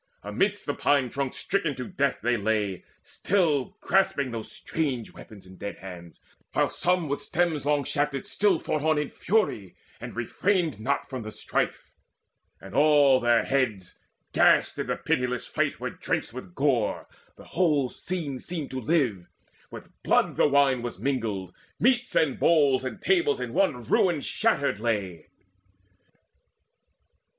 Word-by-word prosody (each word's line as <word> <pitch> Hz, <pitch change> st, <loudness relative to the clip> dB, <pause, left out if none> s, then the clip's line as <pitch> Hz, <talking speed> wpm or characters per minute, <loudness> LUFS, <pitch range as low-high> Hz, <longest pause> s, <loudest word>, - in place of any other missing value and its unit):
Amidst -, -, -1 dB
the -, -, -1 dB
pine 140 Hz, -4 st, +1 dB
trunks 135 Hz, -1 st, -3 dB
stricken 165 Hz, -7 st, -1 dB
to 125 Hz, -, -5 dB
death 140 Hz, -7 st, -1 dB
they 120 Hz, +1 st, +2 dB
lay 105 Hz, -3 st, -1 dB, 0.2 s
Still 165 Hz, -9 st, 0 dB
grasping 145 Hz, -8 st, +1 dB
those 115 Hz, -2 st, -6 dB
strange 135 Hz, -8 st, -3 dB
weapons 100 Hz, -4 st, -13 dB
in 95 Hz, 0 st, -14 dB
dead 100 Hz, -, -6 dB
hands, 85 Hz, -3 st, -11 dB, 0.3 s
While -, -, +2 dB
some 180 Hz, -2 st, 0 dB
with 140 Hz, 0 st, -2 dB
stems 160 Hz, -4 st, -1 dB
long 145 Hz, -1 st, +2 dB
shafted 145 Hz, 0 st, -1 dB
still 205 Hz, -4 st, +2 dB
fought 155 Hz, -, -2 dB
on 155 Hz, 0 st, +2 dB
In 150 Hz, -1 st, -2 dB
fury, 160 Hz, -, -1 dB, 0.2 s
and -, -, -8 dB
refrained 160 Hz, -, 0 dB
not 140 Hz, +6 st, -1 dB
from 130 Hz, -2 st, -5 dB
the 110 Hz, -, -6 dB
strife; -, -, -3 dB, 0.7 s
And -, -, -12 dB
all 145 Hz, -1 st, +5 dB
their 120 Hz, -1 st, +3 dB
heads, 115 Hz, -9 st, -1 dB, 0.3 s
gashed -, -, +4 dB
in -, -, -2 dB
the -, -, 0 dB
pitiless 125 Hz, -1 st, -1 dB
fight, -, -, -1 dB
Were -, -, -3 dB
drenched -, -, -3 dB
with 90 Hz, -2 st, -9 dB
gore 135 Hz, -6 st, 0 dB, 0.3 s
the -, -, -15 dB
whole 155 Hz, -7 st, +1 dB
scene 150 Hz, -2 st, -5 dB
seemed 160 Hz, -2 st, -5 dB
to 130 Hz, 0 st, -4 dB
live 125 Hz, -, 0 dB, 0.4 s
With -, -, -11 dB
blood -, -, +2 dB
the -, -, +4 dB
wine 140 Hz, -3 st, +3 dB
was 120 Hz, -1 st, -5 dB
mingled: 110 Hz, -9 st, -2 dB, 0.3 s
meats 245 Hz, +1 st, +2 dB
and 150 Hz, -5 st, +2 dB
bowls 145 Hz, -6 st, +4 dB
And 130 Hz, -, -5 dB
tables 385 Hz, +3 st, +2 dB
in -, -, -4 dB
one 140 Hz, -11 st, +1 dB
ruin 165 Hz, -, +2 dB
shattered 140 Hz, -, 0 dB
lay. 100 Hz, -8 st, -2 dB
140 Hz, 150 wpm, -26 LUFS, 115-160 Hz, 0.7 s, all